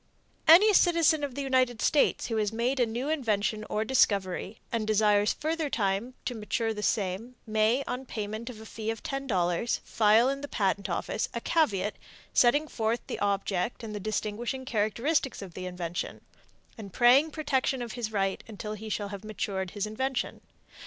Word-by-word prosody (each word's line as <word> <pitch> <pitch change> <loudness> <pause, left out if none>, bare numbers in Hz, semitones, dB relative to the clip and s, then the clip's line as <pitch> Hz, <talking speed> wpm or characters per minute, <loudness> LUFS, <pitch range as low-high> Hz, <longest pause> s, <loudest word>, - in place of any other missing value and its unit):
Any 390 +7 +8
citizen 335 -4 +4
of 275 -4 -3
the 280 - -3
United 255 -3 +2
States 295 +4 +2
who 225 - -2
has 210 -1 +1
made 240 +4 0
a 245 - +3
new 240 +5 -3
invention 215 -8 0
or 215 +1 -1
discovery, 200 -4 +1
and 225 -2 -1
desires 210 -1 +3
further 315 0 -2
time 210 +2 -1
to 250 - -1
mature 225 0 -2
the 210 - -5
same, 210 +4 -1
may, 220 +4 +2
on 255 +1 -5
payment 215 +2 -5
of 230 -4 -9
a 220 - -10
fee 220 0 -5
of 225 -1 -4
$10, 225 -7 0
file 220 +2 +4
in 275 +1 -1
the 285 - -5
Patent 200 -5 -1
Office - - -2
a - - 0
caveat 210 - +1 0.4
setting 290 +5 +4
forth 225 -2 -1
the - - -5
object 200 +2 -1
and 215 -1 -6
the 210 - -4
distinguishing 215 +5 -3
characteristics 240 +5 0
of 185 -3 -10
the 185 +1 -6
invention, 180 -1 -4 0.6
and 200 -3 -8
praying 255 +7 +5
protection 270 -4 -1
of 235 - -6
his 235 -2 -4
right 195 -2 -1
until 210 -1 -6
he 215 +1 -7
shall 205 -1 -2
have 200 0 -7
matured 195 -3 -3
his 205 +2 -3
invention. 245 +3 -3
225 Hz, 175 wpm, -28 LUFS, 205-260 Hz, 0.6 s, Any